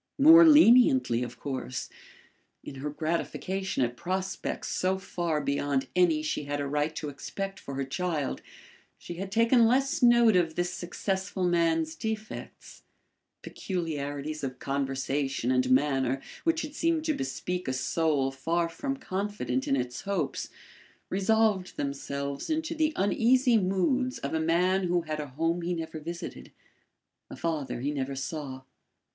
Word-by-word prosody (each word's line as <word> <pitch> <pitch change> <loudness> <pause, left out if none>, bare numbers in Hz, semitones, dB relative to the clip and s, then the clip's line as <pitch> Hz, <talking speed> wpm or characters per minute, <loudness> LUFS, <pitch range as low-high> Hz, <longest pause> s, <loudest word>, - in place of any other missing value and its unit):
More 320 +4 +9
leniently 235 - +6
of 120 -1 -6
course. 130 -3 -4 0.8
In - - -8
her 150 - -2
gratification 170 +3 -2
at 120 0 -2
prospects 185 +6 -3
so 185 +1 0
far 170 -4 -2
beyond 140 -1 -1
any 170 -4 +3
she 150 -1 -2
had 145 0 -2
a 145 - -1
right 150 +2 -1
to 150 - -4
expect 195 +7 -6
for 140 - -7
her 135 0 -2
child, 150 +1 -2 0.6
she 170 - -8
had 195 +1 -5
taken 230 +2 +5
less 270 +3 +1
note 240 -3 +6
of 165 -3 +2
this 175 0 -1
successful 190 +1 -3
man's 165 -2 +2
defects. 220 +3 -6 0.6
Peculiarities 155 -4 -4
of 130 -2 -4
conversation 135 -1 -1
and 130 0 +2
manner 135 0 +2 0.3
which 330 -1 +2
had 300 -1 -7
seemed 325 0 0
to 315 - +2
bespeak 180 -10 -3
a 130 - 0
soul 135 +1 +1
far 165 +5 -1
from 270 +11 -4
confident 190 - -3
in 135 - +2
its 125 -2 -3
hopes, 200 0 -2 0.6
resolved 205 -1 +1
themselves 140 - -4
into 320 +1 -1
the 315 -1 +1
uneasy 240 +5 +3
moods 220 +7 +1
of 140 - -4
a 160 - +1
man 180 +4 +2
who 175 0 +1
had 155 -2 -4
a 150 - -4
home 165 +6 -1
he 175 +1 -1
never 160 -1 -5
visited, 170 +3 -7 0.8
a - - -8
father 150 -7 -3
he 140 +3 -1
never 135 -1 -3
saw. 135 -2 -5
165 Hz, 145 wpm, -28 LUFS, 140-195 Hz, 0.8 s, More